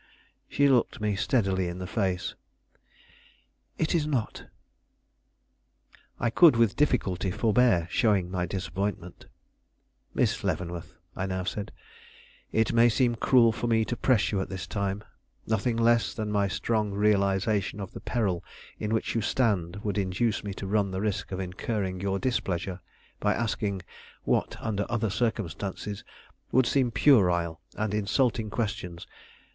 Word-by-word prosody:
She 145 - +3
looked 130 -1 +2
me 105 -1 0
steadily 95 -4 +1
in 85 +1 -5
the 90 - -5
face. 95 -3 -1 1.4
"It 155 - 0
is 160 -3 +1
not." 130 -8 -2 1.7
I 120 - +1
could 165 0 +7
with 115 -3 +3
difficulty 95 -10 +1
forbear 105 -3 +3
showing 100 -6 +2
my 90 -1 -1
disappointment. 95 -1 -4 0.9
"Miss - - +1
Leavenworth," 85 -2 -3 0.2
I 95 - -2
now 95 -1 -2
said, 100 +3 -4 0.8
"it 110 0 +1
may 115 +1 +6
seem 120 +1 +2
cruel 115 0 +4
for 115 +2 -3
me 110 -1 +3
to 120 - -2
press 110 -6 +2
you 100 -2 0
at - - -4
this 95 -3 -5
time; 100 +2 -2 0.4
nothing 110 +2 0
less 115 0 +3
than 110 -1 -3
my 100 -1 +2
strong 105 +1 -1
realization 100 0 +1
of 100 -3 -6
the - - -9
peril 100 -8 -1 0.4
in 105 +1 -1
which 110 - -1
you 115 - 0
stand 100 -5 0
would 105 -1 -1
induce 100 +4 0
me 100 - -4
to 100 - -6
run 100 0 +1
the 95 0 -3
risk 105 -2 -2
of 95 - -3
incurring 95 0 -3
your 100 0 0
displeasure 95 -6 -2 0.4
by 105 0 +1
asking 105 -4 -2 0.4
what - - 0
under 105 -2 -2
other 110 -3 0
circumstances 100 -2 -3 0.5
would 130 0 +4
seem 130 0 +2
puerile 90 - +3
and 110 -1 -2
insulting 110 +2 +1
questions. 100 -6 -3
105 Hz, 145 wpm, -28 LUFS, 95-115 Hz, 1.7 s, could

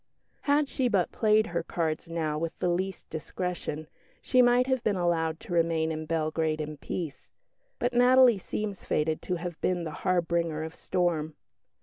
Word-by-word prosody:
Had 290 0 +2
she 260 -2 0
but 195 -7 +1
played 215 -1 +3
her 170 -2 -2
cards 165 -1 -2
now 160 -2 -1
with 165 0 -3
the 180 - 0
least 190 +2 -2
discretion, 160 -1 -4 0.3
she 255 - +3
might 245 +1 +5
have 260 -2 0
been 210 -4 +1
allowed 165 -3 0
to - - -7
remain 165 -1 +2
in 155 0 -4
Belgrade 155 -1 0
in 155 0 -4
peace. 155 0 -5 0.5
But 245 - -1
Natalie 245 -2 +6
seems 205 +1 -4
fated 155 +1 0
to 180 - -2
have 175 -1 -6
been 180 -2 0
the 160 - -4
harbinger 170 -3 0
of 160 0 -6
storm. 165 -4 -1
170 Hz, 165 wpm, -28 LUFS, 160-205 Hz, 0.5 s, Natalie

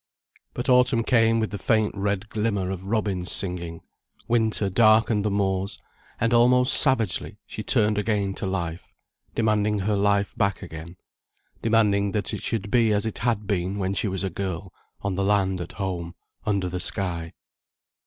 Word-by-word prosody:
But - - -3
autumn 125 -2 +4
came 115 -1 +3
with 110 - -1
the 100 - -5
faint 110 -2 +2
red 100 +1 -1
glimmer 100 -4 -1
of 95 0 -6
robins 100 -4 -1
singing, 85 -3 -2 0.5
winter 110 -3 +2
darkened 110 +1 +4
the 105 - +1
moors, 95 -1 -1 0.4
and 115 0 +1
almost 125 +2 +5
savagely 125 - 0
she - - -7
turned 105 -1 +2
again 105 -2 0
to 95 - -4
life, 85 -3 -4 0.4
demanding 105 -2 +1
her 105 +2 0
life 100 0 +1
back 100 -1 0
again, 85 0 -9 0.6
demanding 105 -3 +2
that 105 -3 -2
it - - -4
should 105 -3 -3
be 115 -3 +4
as 105 +1 +1
it 110 - -4
had 115 -3 0
been 95 -1 -1
when 95 -1 -1
she 105 - 0
was 95 0 -2
a 95 - -2
girl, 95 -1 -4 0.3
on 100 -1 -2
the 95 +1 -1
land 95 -2 +1
at 85 - -7
home, 90 -3 -4 0.3
under 100 -3 +1
the 90 0 -3
sky. 85 -3 -2
100 Hz, 165 wpm, -25 LUFS, 95-110 Hz, 0.6 s, almost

